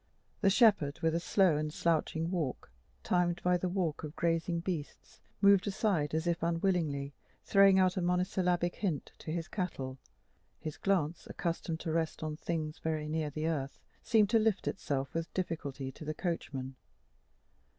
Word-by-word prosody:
The 195 Hz, -, +4 dB
shepherd, 200 Hz, -, +4 dB
with 160 Hz, -1 st, +2 dB
a 165 Hz, -, +1 dB
slow 175 Hz, -2 st, +3 dB
and 150 Hz, 0 st, -2 dB
slouching 165 Hz, +1 st, 0 dB
walk, 155 Hz, -, -3 dB, 0.3 s
timed 175 Hz, -1 st, +1 dB
by 180 Hz, 0 st, +3 dB
the 180 Hz, +1 st, -1 dB
walk 175 Hz, -5 st, -1 dB
of 150 Hz, 0 st, -6 dB
grazing 170 Hz, 0 st, 0 dB
beasts, 170 Hz, -5 st, -5 dB, 0.2 s
moved 200 Hz, -1 st, +6 dB
aside, 190 Hz, -, 0 dB
as 160 Hz, +1 st, 0 dB
if 170 Hz, -1 st, 0 dB
unwillingly, 165 Hz, -5 st, 0 dB, 0.3 s
throwing 195 Hz, -1 st, +6 dB
out 185 Hz, 0 st, +3 dB
a -, -, +1 dB
monosyllabic 180 Hz, -1 st, +1 dB
hint 175 Hz, -9 st, -2 dB
to 155 Hz, -, -6 dB
his 165 Hz, 0 st, -3 dB
cattle; 135 Hz, -9 st, -4 dB, 0.6 s
his 155 Hz, -2 st, -6 dB
glance, 175 Hz, -5 st, 0 dB
accustomed 165 Hz, -1 st, -3 dB
to 160 Hz, -, -3 dB
rest 160 Hz, -1 st, -1 dB
on 155 Hz, -1 st, -3 dB
things 155 Hz, -1 st, -3 dB
very 155 Hz, -1 st, -2 dB
near 155 Hz, -1 st, -1 dB
the 155 Hz, +2 st, -3 dB
earth, 145 Hz, -4 st, -2 dB, 0.2 s
seemed 215 Hz, -3 st, +3 dB
to 225 Hz, -, +5 dB
lift 215 Hz, -3 st, +1 dB
itself 135 Hz, -6 st, -2 dB
with 165 Hz, 0 st, -3 dB
difficulty 145 Hz, -7 st, -3 dB
to 145 Hz, -, -11 dB
the 155 Hz, 0 st, -4 dB
coachman. 135 Hz, -7 st, -4 dB
165 Hz, 160 wpm, -32 LUFS, 155-185 Hz, 0.6 s, moved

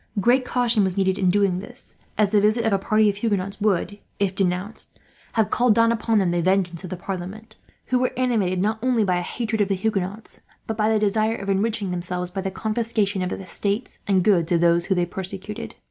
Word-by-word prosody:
Great 245 Hz, +5 st, +3 dB
caution 240 Hz, -4 st, +2 dB
was 190 Hz, -1 st, -1 dB
needed 190 Hz, -1 st, +1 dB
in 185 Hz, -, +3 dB
doing 195 Hz, -1 st, +2 dB
this, 245 Hz, +6 st, -10 dB, 0.2 s
as 210 Hz, -2 st, +3 dB
the 210 Hz, -2 st, +4 dB
visit 215 Hz, +3 st, +2 dB
of 220 Hz, -, +2 dB
a 195 Hz, -, +2 dB
party 215 Hz, +2 st, +3 dB
of 200 Hz, -1 st, 0 dB
Huguenots 200 Hz, -2 st, -2 dB
would, 205 Hz, 0 st, 0 dB, 0.2 s
if 195 Hz, -1 st, 0 dB
denounced, 190 Hz, +3 st, -2 dB, 0.4 s
have 220 Hz, -2 st, +1 dB
called 240 Hz, -3 st, +3 dB
down 230 Hz, 0 st, +4 dB
upon 225 Hz, -1 st, +1 dB
them 190 Hz, -4 st, +2 dB
the 175 Hz, 0 st, +1 dB
vengeance 185 Hz, -1 st, +1 dB
of 185 Hz, -, -6 dB
the 185 Hz, -, -5 dB
parliament; 190 Hz, +4 st, -7 dB, 0.3 s
who 255 Hz, -, +2 dB
were 255 Hz, -, +1 dB
animated 220 Hz, -8 st, +1 dB
not 220 Hz, +2 st, 0 dB
only 245 Hz, -3 st, +2 dB
by 180 Hz, -3 st, +1 dB
hatred 220 Hz, +2 st, -2 dB
of 200 Hz, -, +2 dB
the 195 Hz, -, 0 dB
Huguenots, 200 Hz, +1 st, -3 dB, 0.2 s
but 220 Hz, -, -3 dB
by 215 Hz, 0 st, +1 dB
the 220 Hz, -, +3 dB
desire 215 Hz, +2 st, +1 dB
of 200 Hz, -3 st, -3 dB
enriching 205 Hz, 0 st, 0 dB
themselves 180 Hz, 0 st, -3 dB
by 190 Hz, +1 st, -3 dB
the 190 Hz, -, -2 dB
confiscation 215 Hz, -1 st, -1 dB
of 180 Hz, -, -1 dB
the -, -, -5 dB
estates 200 Hz, +4 st, -2 dB
and 190 Hz, -3 st, +3 dB
goods 175 Hz, -5 st, +3 dB
of 170 Hz, -, +3 dB
those 170 Hz, 0 st, +3 dB
they 180 Hz, -3 st, +2 dB
persecuted. 195 Hz, +5 st, -6 dB
200 Hz, 215 wpm, -23 LUFS, 185-220 Hz, 0.4 s, the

